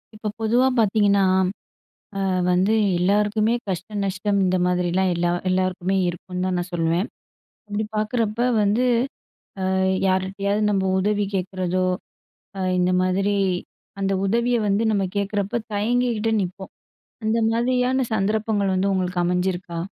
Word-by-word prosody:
இப்ப 215 0 -4
பொதுவா 240 +4 +3
பார்த்தீங்கன்னா, 205 -2 +3 1.0
அ - - -1 0.3
வந்து 185 +4 +3 0.2
எல்லாருக்குமே 210 +4 +2 0.2
கஷ்டம், 200 +3 -3
நஷ்டம் 200 +1 0
இந்த 185 0 +2
மாதிரிலாம் 180 +1 +1
எல்லா 175 0 0 0.2
எல்லாருக்குமே 185 0 0
இருக்கும்னு 180 +1 -5
தான் 185 -1 0
நான் 175 +1 -3
சொல்வேன். 170 +4 0 0.6
அப்டி 210 +1 -2
பாக்குறப்ப 220 +2 0 0.2
வந்து, 210 +5 +2 0.9
ஆ - - +1 0.3
யார்கிட்டயாவது 195 +2 0
நம்ப 195 -2 +1
உதவி 205 +1 +1
கேட்கறதோ, 185 -1 -1 0.7
அ - - -3 0.2
இந்த 180 0 +2
மாதிரி 195 +2 +1 0.7
அந்த 195 0 0
உதவிய 235 +4 +1
வந்து 200 +2 +2
நம்ம 200 -2 +1
கேட்குறப்ப 205 +3 -1
தயங்கிகிட்டே 225 +1 0
நிப்போம். 190 +1 -7 0.5
அந்த 220 +1 +1
மாதிரியான 250 +2 +1
சந்தர்ப்பங்கள் 210 -1 0
வந்து 195 +2 +1
உங்களுக்கு 185 -1 -1
அமைஞ்சிருக்கா? 180 -1 -1
200 Hz, 120 wpm, -23 LUFS, 185-215 Hz, 1.0 s, பொதுவா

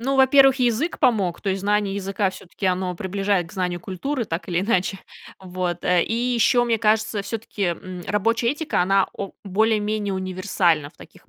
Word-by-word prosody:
Ну, 270 +3 0
во-первых, 270 0 +6
язык 250 +7 0
помог, 195 -8 +1
то 195 - -1
есть 190 0 -2
знание 205 -1 0
языка 195 0 -1
всё-таки 190 +1 -6
оно 185 0 0
приближает 195 -2 -1
к - - -15
знанию 180 -2 -2
культуры 235 +8 -3
так 170 0 -5
или 175 0 0
иначе. 195 -2 0 0.4
Вот, 180 -2 -4
э, 180 -1 +3
и - - -3 0.2
ещё, 240 +1 +3
мне 230 -2 +1
кажется, 215 -1 +1
всё-таки, 220 -1 -5
м, 180 0 -3
рабочая 230 +3 +1
этика, 295 - -1
она 195 +1 +3
о 195 - -5
более-менее 210 0 0
универсальна 185 -5 0
в - - -32
таких - - -17
200 Hz, 175 wpm, -23 LUFS, 185-225 Hz, 0.4 s, во-первых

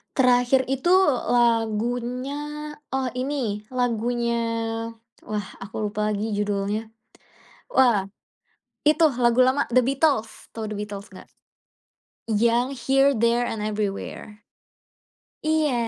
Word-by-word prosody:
Terakhir 250 0 +3
itu 270 +7 +2 0.4
lagunya, 240 +3 0 0.6
oh 265 -1 0
ini, 250 -6 -2
lagunya, 235 -1 0 0.9
wah, 210 -2 -3
aku 210 +1 -4
lupa 210 +1 -1
lagi 210 +2 -2
judulnya. 205 +1 -1 0.8
Wah, 225 -7 +3 0.7
itu 310 +2 +4 0.2
lagu 240 +1 +3
lama, 265 +2 +2
The 250 0 +3
Beatles, 275 -4 0
tahu 220 - -3
The - - -5
Beatles 205 -1 -6
enggak? - - -13 1.0
Yang 235 +3 +2 0.2
Here 270 +1 +4
There 235 +2 +2
and 210 -2 -3
Everywhere. 210 0 -4 1.1
Iya, 310 -3 +2
235 Hz, 100 wpm, -24 LUFS, 210-260 Hz, 1.1 s, itu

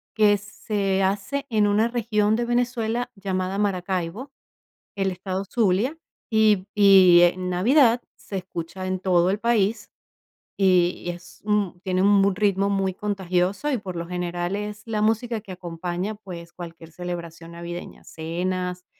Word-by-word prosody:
que 210 -1 +5
se 200 -1 -2
hace 205 +9 -1
en 210 -2 +3
una 210 +3 +3
región 220 -3 +1
de 240 +1 -1
Venezuela 240 0 -1
llamada 190 -1 -2
Maracaibo, 190 +5 -2 0.7
el 195 -1 0
estado 185 +1 -4
Zulia, 225 - +1 0.3
y 215 -3 +3
y 190 -4 +7
en 180 +1 +2
Navidad 235 - +4
se 200 - -7
escucha 175 +1 -6
en 185 0 -1
todo 180 -1 +3
el 205 - 0
país, 225 -1 +1 0.7
y 180 -3 +3
y - - -2
es 175 +1 -13
un 205 -4 0
tiene 185 0 0
un 200 0 +5
m 200 - +3
ritmo 200 -1 +1
muy 195 -1 0
contagioso 190 +5 -1
y, 260 - +1
por 190 -4 -7
lo 170 0 -4
general, 175 +1 -3
es 210 0 -5
la 215 -2 -2
música 225 +1 +1
que 195 -3 -9
acompaña, 180 +3 -4
pues, 175 -5 -10
cualquier 165 -2 -10
celebración 170 -1 -7
navideña, 170 +1 -8
cenas, 180 +2 -3
195 Hz, 150 wpm, -24 LUFS, 180-210 Hz, 0.7 s, y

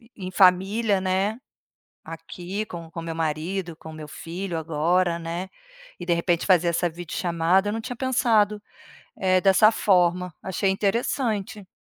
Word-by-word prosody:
em 185 -2 -6
família, 195 +3 +3
né, 190 +3 0 0.7
aqui 175 +5 -6
com 170 -4 -9
com 165 - -6
meu 165 0 -4
marido, 165 +3 -2
com 160 - -10
meu 155 -1 -9
filho 170 +4 -5
agora, 170 +2 +1
né, 170 +3 -4 0.5
e 175 - -6
de 175 - +2
repente 170 0 0
fazer 180 -3 +4
essa 170 +1 0
videochamada 175 +3 0
eu - - -2
não 225 - -3
tinha 245 +2 -6
pensado, 230 -5 +2 0.6
eh, 185 -1 +3
dessa 195 +3 +6
forma, 180 -3 +2
achei 190 +1 0
interessante. 210 0 -1
185 Hz, 140 wpm, -24 LUFS, 170-200 Hz, 0.7 s, dessa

